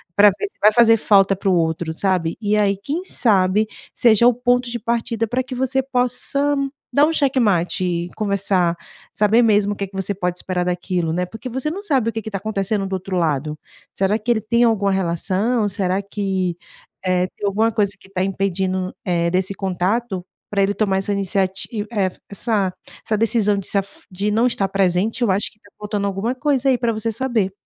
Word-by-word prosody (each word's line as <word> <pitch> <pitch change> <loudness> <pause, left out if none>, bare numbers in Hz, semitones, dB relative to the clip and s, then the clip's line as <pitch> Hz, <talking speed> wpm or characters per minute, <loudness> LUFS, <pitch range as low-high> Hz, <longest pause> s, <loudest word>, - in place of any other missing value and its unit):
Pra 205 0 +8
ver 205 - -3
se - - -23
vai 210 +1 +7
fazer 230 -1 +6
falta 195 -2 +4
para 195 +1 -1
o - - +3
outro, 160 -1 0
sabe, 180 -2 0
e 210 0 +1
aí, 200 -2 +2
quem 320 +6 -2
sabe 205 - +3 0.3
seja 235 -1 +5
o 245 - +5
ponto 245 +1 +1
de 240 - -3
partida 230 0 -1
pra 250 +4 -1
que 255 - -8
você 265 +1 0
possa 270 +3 0 0.4
dar 290 +1 +6
um 325 - -1
xeque-mate 215 - +1
e 175 0 -2
conversar, 195 -4 +1 0.4
saber 215 +3 +4
mesmo 205 -2 +3
o - - -8
que 200 -1 -4
que 195 - -16
você 195 +1 -2
pode 180 -2 -2
esperar 180 -1 -2
daquilo, 175 -2 -1
né, 180 +2 0
porque 225 +7 -8
você 265 +5 -2
não 390 - -5
sabe 270 - +1
o - - -5
que 225 - -3
que 220 - -6
tá 195 - -2
acontecendo 200 -1 -1
do 195 - -6
outro 190 0 -3
lado. 155 -2 -1 0.4
Será 195 +3 +1
que 225 - -7
ele 225 -2 +1
tem 235 +3 +2
alguma 210 -4 +2
relação? 195 +5 0
Será 190 -1 -1
que, 190 -3 -2 0.5
eh, 185 -1 +2
tem 205 - -3
alguma 220 +3 +2
coisa 205 -2 0
que - - -18
tá 185 -1 -1
impedindo, 190 -1 -1
eh, 170 -2 0
desse 190 +2 0
contato, 190 +2 -1 0.3
pra 200 -1 +1
ele 200 +1 +1
tomar 195 -3 +1
essa 200 +1 -3
iniciati 195 -1 -1 0.2
eh, 195 -5 0 0.2
essa 200 -2 -1 0.3
essa 215 - 0
decisão 210 -2 +2
de 195 - -4
se - - -3
af 195 0 -9
de 200 +3 -1
não 225 +3 +2
estar 220 -5 +1
presente? 195 +5 +1
Eu 210 - +3
acho 195 +2 0
que 215 - -26
tá 205 - -21
faltando 210 -1 -2
alguma 200 +6 -2
coisa 275 -1 +1
aí 255 - +3
pra 235 -1 0
você 220 +1 -2
saber. 230 -5 -1
200 Hz, 205 wpm, -20 LUFS, 185-230 Hz, 0.5 s, Pra